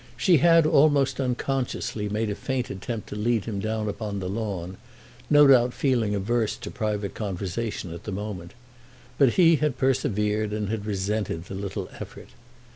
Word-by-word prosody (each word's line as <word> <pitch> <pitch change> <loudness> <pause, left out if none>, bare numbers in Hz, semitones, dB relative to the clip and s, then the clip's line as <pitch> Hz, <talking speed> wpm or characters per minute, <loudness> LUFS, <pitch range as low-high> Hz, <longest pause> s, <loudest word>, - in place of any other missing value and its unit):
She 180 -4 +4
had, 165 +2 +5
almost 145 -3 +3
unconsciously, 125 -4 -2
made 105 +1 -1
a - - 0
faint 130 +1 -3
attempt 110 +3 -5
to - - -6
lead 110 0 0
him 105 -3 -3
down 110 +1 -2
upon 105 0 -4
the 95 -2 -4
lawn, 95 -3 -4 0.5
no 145 -1 +7
doubt 125 -3 +5
feeling 120 -7 +1
averse 110 +2 0
to - - -7
private 105 -2 -2
conversation 100 -1 -4
at 85 - -10
the 105 - -4
moment; 95 -3 -6 0.6
but 135 -4 +5
he 165 -3 +5
had 150 -3 -1
persevered, 105 -5 0
and 105 -2 -2
had 110 -1 -3
resented 100 -3 -2
the 95 - -8
little 95 0 -4
effort. - - -9
110 Hz, 165 wpm, -25 LUFS, 100-130 Hz, 0.6 s, no